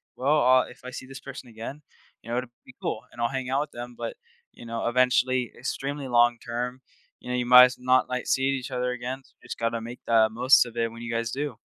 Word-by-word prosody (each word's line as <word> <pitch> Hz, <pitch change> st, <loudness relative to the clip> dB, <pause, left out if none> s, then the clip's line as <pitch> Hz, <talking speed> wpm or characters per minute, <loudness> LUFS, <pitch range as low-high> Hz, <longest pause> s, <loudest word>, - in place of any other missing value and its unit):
"Well, 145 Hz, +3 st, +2 dB
uh, 130 Hz, 0 st, +5 dB
if -, -, -14 dB
I -, -, -5 dB
see 130 Hz, -, -7 dB
this 135 Hz, 0 st, -9 dB
person 135 Hz, -2 st, -9 dB
again, 115 Hz, +7 st, -8 dB, 0.4 s
you 115 Hz, -, -8 dB
know, 120 Hz, -, 0 dB
it'd 125 Hz, -1 st, -7 dB, 0.2 s
be 130 Hz, -, -14 dB
cool, 110 Hz, -, -2 dB
and 120 Hz, -, -8 dB
I'll 120 Hz, -, +3 dB
hang 130 Hz, -2 st, -3 dB
out 135 Hz, +2 st, +1 dB
with 150 Hz, -, -5 dB
them," 120 Hz, 0 st, -8 dB
but, -, -, -5 dB, 0.4 s
you 120 Hz, -, -13 dB
know, 115 Hz, 0 st, -3 dB
eventually, 125 Hz, 0 st, +2 dB
extremely 140 Hz, +2 st, -4 dB
long 120 Hz, -1 st, +4 dB
term, 125 Hz, +2 st, -4 dB, 0.4 s
you -, -, -10 dB
know, 125 Hz, -, 0 dB
you 120 Hz, -, -1 dB
might 125 Hz, +1 st, +10 dB
s 125 Hz, -, -3 dB
not, 130 Hz, 0 st, +3 dB
like, 125 Hz, 0 st, -2 dB
seeing 135 Hz, +1 st, +2 dB
each 130 Hz, 0 st, -6 dB
other 125 Hz, 0 st, -1 dB
again, 125 Hz, +2 st, -5 dB, 0.2 s
just -, -, -7 dB
gotta 115 Hz, 0 st, 0 dB
make 120 Hz, +2 st, -8 dB
the 110 Hz, -1 st, +5 dB
most 125 Hz, +3 st, +5 dB
of 120 Hz, -1 st, -10 dB
it 115 Hz, -1 st, 0 dB
when 115 Hz, 0 st, -10 dB
you 115 Hz, 0 st, -4 dB
guys 115 Hz, 0 st, -1 dB
do. 140 Hz, -4 st, -3 dB
125 Hz, 245 wpm, -26 LUFS, 120-130 Hz, 0.4 s, might